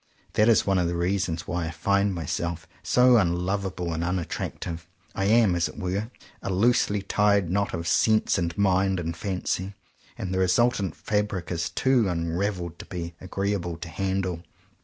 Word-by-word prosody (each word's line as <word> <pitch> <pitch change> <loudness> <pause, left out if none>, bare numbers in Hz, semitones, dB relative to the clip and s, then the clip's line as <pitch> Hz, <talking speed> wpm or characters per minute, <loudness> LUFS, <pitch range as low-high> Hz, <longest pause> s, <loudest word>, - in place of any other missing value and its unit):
That 105 +2 +4
is 115 - +4
one 95 -2 +2
of 90 - +1
the 85 - -2
reasons 85 -2 -1
why 85 -1 -2
I - - -3
find 100 +4 +1
my 85 -4 -4
self 85 +2 -3
so 125 0 +5
unlovable 90 -1 0
and 80 +1 -2
unattractive. 85 -1 -3 0.3
I 95 - -1
am, 110 -2 +4
as 85 -1 +1
it - - -12
were, 95 +5 -2 0.3
a - - -4
loosely 105 0 +2
tied 100 -3 +2
knot 100 0 0
of 85 0 -4
sense 110 +2 +3
and 85 -1 -2
mind 95 -1 +2
and 85 -1 -3
fancy; 95 +1 -3 0.4
and 95 - -4
the 95 - 0
resultant 95 0 +2
fabric 105 -4 -2
is 85 -1 -1
too 125 -6 +2
unraveled 85 +1 -2
to - - -8
be 85 -2 -5
agreeable 95 -2 -2
to 85 0 -7
handle. 95 -1 -2
95 Hz, 170 wpm, -26 LUFS, 85-100 Hz, 0.4 s, so